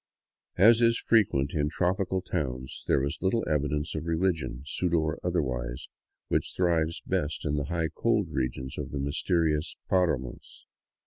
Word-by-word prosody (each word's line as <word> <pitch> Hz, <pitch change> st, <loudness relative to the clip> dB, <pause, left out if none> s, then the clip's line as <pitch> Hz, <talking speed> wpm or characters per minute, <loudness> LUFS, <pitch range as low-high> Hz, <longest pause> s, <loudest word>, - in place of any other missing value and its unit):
As 115 Hz, +5 st, +7 dB
is 115 Hz, 0 st, +4 dB
frequent 80 Hz, -12 st, +2 dB
in 75 Hz, -1 st, +1 dB
tropical 95 Hz, +2 st, 0 dB
towns, 65 Hz, -8 st, -4 dB
there -, -, +3 dB
was 70 Hz, +1 st, -3 dB
little 95 Hz, +5 st, +1 dB
evidence 75 Hz, 0 st, 0 dB
of 85 Hz, -, -4 dB
religion, 80 Hz, -6 st, -1 dB
pseudo 85 Hz, +3 st, 0 dB
or 80 Hz, -1 st, -1 dB
otherwise, 65 Hz, -9 st, -2 dB, 0.4 s
which -, -, 0 dB
thrives 85 Hz, -2 st, +1 dB
best 75 Hz, +1 st, -1 dB
in 75 Hz, -, 0 dB
the 70 Hz, -1 st, -1 dB
high, 80 Hz, +1 st, -1 dB
cold -, -, +1 dB
regions 65 Hz, 0 st, -3 dB
of -, -, -4 dB
the 70 Hz, -, -5 dB
mysterious 80 Hz, +2 st, 0 dB, 0.2 s
paramos. 80 Hz, -10 st, -1 dB
80 Hz, 145 wpm, -28 LUFS, 70-90 Hz, 0.4 s, As